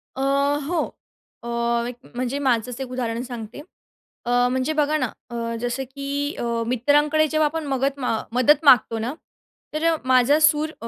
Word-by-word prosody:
अ, 265 - -4 0.5
हो 340 -2 0 0.6
अ, 235 - -6 0.4
एक 245 - -6 0.2
म्हणजे 255 +2 -2
माझंच 250 -2 0
एक 260 - -5
उदाहरण 235 -2 -2
सांगते. 235 -1 -8 0.7
अ, 240 - -1 0.2
म्हणजे 260 +4 0
बघा 300 0 +1
ना, - - -1 0.2
अ, 235 - -7 0.3
जसं 245 +2 -2
की, 280 +2 -4
अ - - -2 0.2
मित्रांकडे 295 +5 +2
जेव्हा 310 0 +1
आपण 320 0 -4
मगत 275 +2 -1
अ, 225 -3 +1 0.2
मदत 280 +5 +4
मागतो 235 -4 +5
ना, 235 +4 -3 0.6
तर 310 - -2
अ, 325 - +1
माझा 255 +3 +4
सूर 305 0 +3
अ, 230 - -5
270 Hz, 165 wpm, -23 LUFS, 245-295 Hz, 0.7 s, मागतो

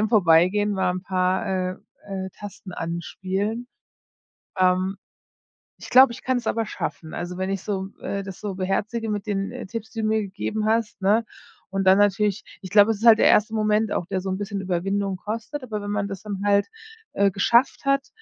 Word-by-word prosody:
im 215 - +1
vorbeigehen, 195 0 +4
mal 190 -2 +1
'n 185 - -5
paar, 185 0 0
äh 185 -1 -1 0.3
äh 190 -1 -4
Tasten 205 -2 -9
anspielen. 190 +7 -3 0.9
Ähm, 185 +1 +2 0.8
Ich - - -10
glaube, 260 0 +8
ich 235 - -10
kann 260 -1 +1
es 235 - -8
aber 225 -1 0
schaffen. 155 -3 -5
Also 180 +1 -5
wenn 190 +1 -2
ich 195 - -2
so, 190 -2 -3
äh 200 0 -3
das 190 -2 -8
so 205 -3 -4
beherzige 210 +4 -2
mit 205 0 -3
den, 195 -1 -1
äh, - - -7
Tipps, 220 +1 -6
die 225 - -4
du 215 - 0
mir 220 0 +2
gegeben 205 +2 -3
hast, 225 0 0
ne? 210 +4 +3 0.5
Und 195 0 -1
dann 190 0 +6
natürlich 205 0 +2 0.2
ich 185 - -9
glaube, 205 +1 +6
es 220 - -2
ist 225 - -4
halt 225 -1 +8
der - - +5
erste 215 +1 +4
Moment 215 0 +1
auch, 175 - -2
der 190 -1 -1
so 190 - -4
'n 190 - -1
bisschen 200 -1 -3
Überwindung 195 +1 -1
kostet, 230 +9 -5
aber 220 -5 -4
wenn 205 - -4
man 205 -1 -1
das 195 -1 -7
dann 200 -2 -5
halt, 200 0 +3 0.5
äh, 200 0 +3
geschafft 235 +8 +2
hat, 275 0 +2
200 Hz, 205 wpm, -24 LUFS, 190-215 Hz, 0.9 s, glaube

